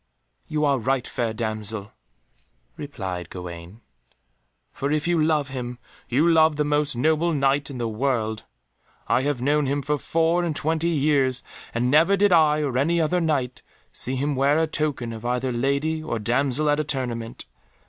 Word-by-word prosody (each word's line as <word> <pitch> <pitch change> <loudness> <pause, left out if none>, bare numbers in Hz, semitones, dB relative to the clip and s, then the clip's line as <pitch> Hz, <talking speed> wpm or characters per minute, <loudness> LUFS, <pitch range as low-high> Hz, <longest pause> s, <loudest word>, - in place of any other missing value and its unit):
"You 150 0 0
are 140 -2 +2
right, 130 +2 0
fair 115 -2 -2
damsel," 110 -2 -3 0.8
replied 95 - -6
Gawaine, 90 +3 -9 0.9
"for 140 +1 -2
if 155 +1 0
you 170 -2 +2
love 155 -3 +1
him, 125 -2 -5 0.3
you 145 +7 +3
love 160 -2 +5
the 150 0 0
most 145 -2 0
honourable 160 +6 +2
Knight 140 0 +1
in 135 - -7
the 120 -1 -2
world. 110 -2 -1 0.6
I 115 +3 +2
have 135 -3 -1
known 145 +1 +2
him 140 +1 -1
for 150 +2 -1
four 165 +3 +1
and 165 -3 -2
twenty 160 +3 0
years, 140 -5 +1 0.3
and 125 +2 0
never 165 +7 +5
did 200 -1 +4
I 155 -2 +4
or 130 -3 0
any 170 +5 +2
other 165 +3 +1
Knight 135 -6 -1 0.3
see 130 - -3
him 140 +2 -1
wear 140 +3 +3
a 160 - +3
token 145 -7 -2
of 110 0 -8
either 125 +1 -1
lady 140 +6 0
or 155 -7 -3
damsel 130 +6 +1
at 145 - +1
a - - +1
tournament. 125 -5 -3
140 Hz, 170 wpm, -24 LUFS, 120-155 Hz, 0.9 s, love